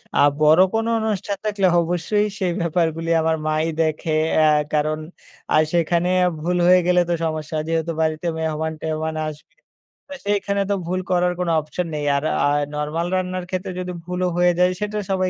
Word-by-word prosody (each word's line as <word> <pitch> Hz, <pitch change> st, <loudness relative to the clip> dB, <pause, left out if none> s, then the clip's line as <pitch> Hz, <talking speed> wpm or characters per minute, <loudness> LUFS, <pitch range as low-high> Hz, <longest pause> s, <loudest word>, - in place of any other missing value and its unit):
আ -, -, +2 dB, 0.2 s
বড় 155 Hz, +3 st, +6 dB
কোনো 225 Hz, +1 st, 0 dB
অনুষ্ঠান 205 Hz, -2 st, -2 dB
থাকলে 205 Hz, -3 st, +1 dB
অবশ্যই 180 Hz, +5 st, 0 dB
সেই 185 Hz, -3 st, 0 dB
ব্যাপারগুলি 165 Hz, -1 st, 0 dB
আমার 160 Hz, 0 st, +1 dB
মাই 155 Hz, +1 st, +1 dB, 0.2 s
দেখে। 155 Hz, 0 st, -1 dB, 0.2 s
অ্যা 155 Hz, 0 st, +5 dB, 0.3 s
কারণ 155 Hz, +1 st, +1 dB, 0.5 s
আ -, -, +5 dB, 0.2 s
সেখানে 170 Hz, +1 st, +1 dB, 0.3 s
ভুল 175 Hz, +3 st, -1 dB
হয়ে 180 Hz, 0 st, +7 dB
গেলে 180 Hz, 0 st, +4 dB
তো -, -, +2 dB
সমস্যা। 155 Hz, -1 st, -3 dB
যেহেতু 165 Hz, 0 st, -1 dB
বাড়িতে 160 Hz, +1 st, -1 dB
মেহমান-টেহমান 160 Hz, 0 st, -3 dB
আসবে। 150 Hz, -1 st, -9 dB, 0.6 s
তো -, -, -5 dB
সেইখানে 200 Hz, -1 st, 0 dB
তো -, -, +2 dB
ভুল 185 Hz, +1 st, -1 dB
করার 180 Hz, 0 st, +2 dB
কোনো 180 Hz, -2 st, 0 dB
অপশন 165 Hz, +3 st, -4 dB
নেই। 145 Hz, -1 st, -3 dB
আর 140 Hz, -, -1 dB, 0.2 s
আ -, -, +4 dB, 0.3 s
নরমাল 150 Hz, +3 st, -2 dB
রান্নার 185 Hz, -1 st, -2 dB
ক্ষেত্রে 185 Hz, 0 st, -3 dB
যদি 180 Hz, 0 st, -4 dB
ভুলও 180 Hz, 0 st, -1 dB
হয়ে 175 Hz, 0 st, +4 dB
যায় 180 Hz, 0 st, +4 dB
সেটা 210 Hz, 0 st, -2 dB
সবাই 185 Hz, -1 st, +1 dB
170 Hz, 170 wpm, -21 LUFS, 155-185 Hz, 0.6 s, হয়ে